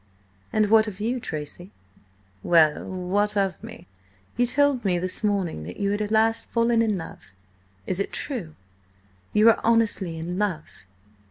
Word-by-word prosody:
"And 215 -1 +1
what 220 0 +5
of 200 -2 -7
you, 235 +4 -1
Tracy?" 175 -3 -6 0.7
"Well? 160 -3 +3
What 200 +3 -1
of 195 -1 -1
me?" 225 -5 -10 0.5
"You 245 +1 +2
told 285 -1 +2
me 185 -3 +1
this 185 +4 -3
morning 195 - -1
that 90 - -8
you 200 0 0
had 205 +1 -1
at 210 - -2
last 225 +1 +2
fallen 230 0 +2
in 215 -3 +1
love. 165 - -10 0.6
It 185 - -1
is 200 - 0
true? 205 - -4 0.8
You 215 +2 +4
are 225 - +2
honestly 220 -7 +2
in 175 +3 -4
love?" 185 -7 -2
205 Hz, 160 wpm, -24 LUFS, 180-225 Hz, 0.8 s, what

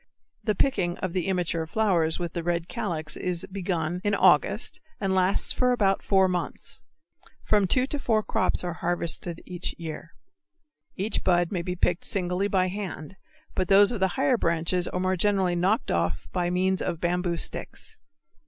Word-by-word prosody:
The 215 -2 +1
picking 185 -8 +1
of 185 -2 -3
the 185 -2 -1
immature 175 -3 -1
flowers 170 -5 +1
with 175 -2 -4
the 170 - -2
red 170 0 -1
calyx 170 -10 -2
is 180 -2 -3
begun 180 -3 -2
in 205 -1 +2
August - - +3 0.2
and 195 -2 0
lasts 185 +1 +2
for 250 0 +2
about 200 -5 +2
four 190 -1 +3
months. 180 -2 -4 0.6
From 205 -3 +3
two 255 +7 +3
to 290 +2 -4
four 220 -5 +1
crops - - +1
are 175 -1 -2
harvested 170 0 -3
each 180 0 -4
year. 165 0 -7 0.8
Each 200 +3 -1
bud 175 -2 +2
may 180 -4 -1
be 180 +1 -3
picked 175 0 0
singly 185 -1 0
by 190 -2 +2
hand, 190 -3 -5 0.4
but 185 - -1
those 200 +3 +6
of 235 - -3
the 190 - +3
higher 265 -2 +3
branches 170 0 0
are 180 - -3
more 185 0 +1
generally 190 -1 +2
knocked 190 +6 +1
off 85 -3 -1
by 175 -1 0
means 185 +1 +1
of 170 - -2
bamboo 175 0 0
sticks. 445 - -4
180 Hz, 170 wpm, -26 LUFS, 175-200 Hz, 0.8 s, those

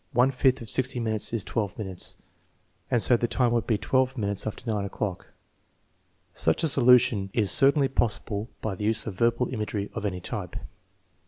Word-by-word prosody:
One 125 +3 +3
fifth 130 -1 +1
of 110 - -10
60 130 -1 -1
minutes 110 -2 -1
is 115 -4 -2
12 105 -5 -3
minutes, 95 -4 -1 0.7
and 120 - +5
so 125 - +6
the 120 - -1
time 120 0 +1
would 120 -1 0
be 110 - +1
12 130 +4 0
minutes 100 -2 -1
after 110 - -6
9 105 -3 -1
o'clock." 100 -2 -4 1.1
Such 80 - 0
a - - +3
solution 125 -7 +4
is 105 -4 +2
certainly 140 0 +4
possible 110 -3 -2
by 110 - -3
the 105 +2 -5
use 110 0 +1
of 110 - -5
verbal 115 +5 +1
imagery 105 -3 -4
of 110 - -5
any 95 -3 -2
type. - - -5
115 Hz, 180 wpm, -26 LUFS, 105-125 Hz, 1.1 s, so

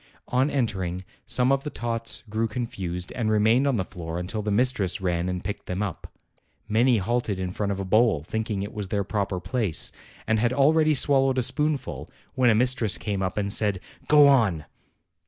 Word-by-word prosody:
On 130 +3 +2
entering, 95 -9 -2 0.2
some 125 +1 +2
of 135 0 +1
the 150 - -4
tots 115 -3 -3
grew 110 +2 -1
con 120 +1 -3
fused 90 -4 -5
and 115 -3 -2
remained 110 +5 +3
on 135 - +1
the 95 -4 -1
floor 80 -2 -7
until 90 +5 -4
the 105 - -3
mistress 110 -2 +2
ran 90 -1 -1
and 90 0 -4
picked 100 +2 -6
them 90 +3 -2
up. 95 -6 -6 0.6
Many 115 +3 +3
halted 110 -1 -1
in 90 -1 -3
front 100 +2 -2
of 100 - -3
a 100 - -3
bowl, 110 -5 +2
thinking 110 +2 -3
it 100 - -7
was 105 -2 -5
their 100 +1 -1
proper 100 -2 -2
place, 110 - -1 0.3
and 110 +1 +1
had 120 +2 +1
already 155 +3 +3
swallowed 135 -1 +3
a 130 - +2
spoonful, 145 - -1 0.2
when 130 -2 +3
a 110 - +4
mistress 120 -2 +2
came 100 -3 -3
up 95 +1 -3
and 100 -1 +1
said, 105 -4 +1 0.3
"Go 150 -1 +7
on!" 110 - +3
110 Hz, 195 wpm, -25 LUFS, 95-125 Hz, 0.6 s, Go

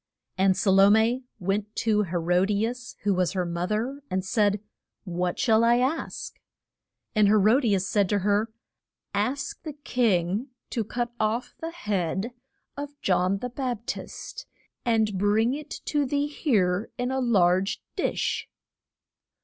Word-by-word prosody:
And 190 0 +3
Sa 200 - +2
lo 195 +1 +7
me 230 +4 +3
went 200 +3 -2
to 215 -2 +2
He 185 -3 -3
ro 175 +2 +2
di 205 +2 +1
as 245 +1 -6
who 200 -1 +2
was 185 0 +1
her 185 -2 0
mo 170 +1 -2
ther 240 +7 -2
and 185 0 -1
said, 205 0 +2 0.4
What 180 -2 -2
shall 225 -3 +3
I 235 +1 +5
ask? 260 +6 -2 0.7
And 215 -3 +4
He 205 - +5
ro 215 +5 +5
di 225 -7 +2
as 190 0 0
said 200 -3 +2
to 205 - +2
her, 205 +3 +1 0.6
Ask 250 +8 -2
the 310 - -6
king 225 - 0 0.2
to 230 - 0
cut 240 +3 -3
off 220 +3 -1
the 325 - -4
head 205 - -2 0.4
of 285 0 -7
John 185 +1 +2
the 250 +5 -4
Bap 245 -3 -3
tist, - - -6 0.4
and 220 -4 +1
bring 215 +5 +3
it 300 +1 -6 0.2
to 290 -2 +1
thee 285 +2 +1
here 215 - +1
in 250 +1 -1
a 265 - 0
large 195 -5 +2 0.2
dish. - - -1
215 Hz, 160 wpm, -26 LUFS, 190-245 Hz, 0.7 s, lo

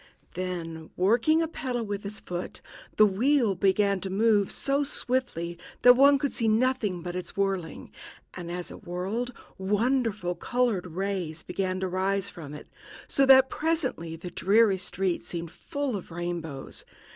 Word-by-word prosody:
Then, 170 -3 -5
working 235 - +3
a - - -1
pedal 250 -6 -3
with 205 -2 -4
his 205 +1 -6
foot, 175 0 -6 0.4
the 215 - +7
wheel 230 +3 +2
began 195 +1 +2
to 190 - -4
move 205 0 +3
so 280 +1 0
swiftly 245 - -2 0.2
that 245 - +10
one 280 +2 +6
could 285 0 -2
see 230 - +1
nothing 220 -5 +1
but 175 0 -5
its 180 +1 -5
whirling; 195 -4 -2 0.4
and 175 -2 -7
as 175 0 -5
it - - -11
whirled, 195 +7 -3 0.3
wonderful 210 -1 0
colored 220 0 0
rays 180 -2 -3
began 185 +1 -2
to 190 - 0
rise 190 +2 0
from 150 -5 -9
it, 150 - -10 0.4
so 275 -1 +3
that 265 0 +7
presently 275 - -1
the 175 +2 -8
dreary 200 +2 +3
street 185 0 -2
seemed 170 -2 -6
full 285 - -3
of 190 - -6
rainbows. 170 -5 -5
195 Hz, 155 wpm, -27 LUFS, 175-245 Hz, 0.4 s, that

